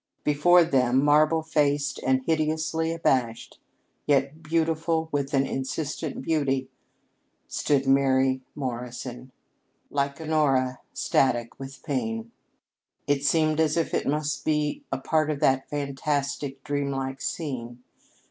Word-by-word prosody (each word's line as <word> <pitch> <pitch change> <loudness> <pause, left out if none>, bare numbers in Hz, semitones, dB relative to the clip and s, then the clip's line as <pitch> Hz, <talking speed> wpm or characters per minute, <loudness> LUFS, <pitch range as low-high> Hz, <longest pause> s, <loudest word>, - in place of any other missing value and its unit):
Before 175 +4 +5
them, 130 -4 +2
marble 155 +2 +4
faced 145 -2 +1
and 130 0 +2
hideously 160 0 0
abashed, 130 -8 -1 0.5
yet 140 +2 +1
beautiful 160 0 0
with 140 -1 -1
an 135 0 +3
insistent 140 +3 -4
beauty, 135 -4 0 0.8
stood 140 -2 0
Mary 135 -1 +3
Morrison, 125 -1 -5 0.6
like 140 0 -1
Honora, 140 -5 +1
static 120 -3 0
with 135 0 -9
pain. 115 -6 -3 0.7
It 145 -1 +1
seemed 155 0 +2
as 160 0 +2
if 165 - 0
it - - 0
must 150 +1 -1
be 150 -1 0
a 135 - 0
part 155 +3 +1
of 150 -2 -1
that 135 0 +2
fantastic, 140 -1 -2
dream 145 -1 -1
like 135 -1 -3
scene. 125 -6 -4
140 Hz, 120 wpm, -26 LUFS, 130-155 Hz, 0.8 s, Before